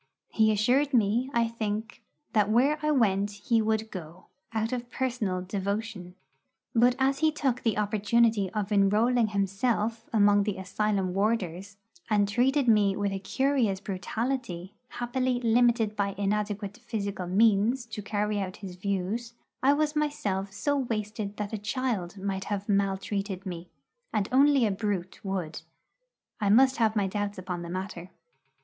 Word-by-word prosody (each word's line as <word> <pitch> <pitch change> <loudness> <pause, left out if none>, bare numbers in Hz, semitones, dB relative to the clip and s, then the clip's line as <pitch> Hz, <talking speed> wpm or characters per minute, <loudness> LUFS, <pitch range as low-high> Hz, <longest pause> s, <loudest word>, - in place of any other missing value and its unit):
He 220 -1 +3
assured 250 +7 +2
me, 230 +4 +2
I 235 -3 +2
think, 225 +1 -4 0.3
that 210 -3 +3
where 270 +7 +3
I 305 - 0
went 205 -8 +2
he 215 +3 +1
would 220 0 -1
go, 175 -1 -9 0.3
out 225 +1 -1
of 240 -1 -4
personal 225 -9 -2
devotion. 200 -1 -4 0.6
But 245 +1 +4
as 270 +1 +1
he 315 0 +3
took 270 -5 -1
the 225 -3 0
opportunity 210 0 +2
of 210 -1 -2
enrolling 215 +4 +3
himself 215 +3 -1
among 205 -2 +5
the 205 -1 -2
asylum 190 0 -1
warders, 195 -2 -1 0.3
and 205 -2 +3
treated 255 +5 +2
me 205 -3 +4
with 205 -1 0
a 195 - -3
curious 240 -1 +1
brutality, 200 -1 -3
happily 250 +1 -1
limited 235 -2 +3
by 200 -1 -1
inadequate 205 +1 -2
physical 200 -6 -3
means 220 +5 +3
to 220 -2 -7
carry 210 0 -1
out 185 -2 -4
his 180 -1 -8
views 200 +5 -3 0.3
I 275 +2 +5
was 300 +1 0
myself 220 -11 -1
so 285 +8 -1
wasted 215 -4 -3
that 210 0 -4
a 215 - -2
child 210 -5 -2
might 195 0 -3
have 205 -1 -3
maltreated 195 -1 -1
me, 175 -2 -6 0.4
and 210 -3 0
only 275 -1 +5
a 210 - +1
brute 195 -2 -3
would 190 -5 -3 0.8
I 205 - +1
must 260 +5 +5
have 225 -2 +2
my 205 -2 +2
doubts 205 +1 -3
upon 180 -1 -4
the 170 - -7
matter. 185 -1 -5
210 Hz, 150 wpm, -28 LUFS, 195-235 Hz, 0.8 s, among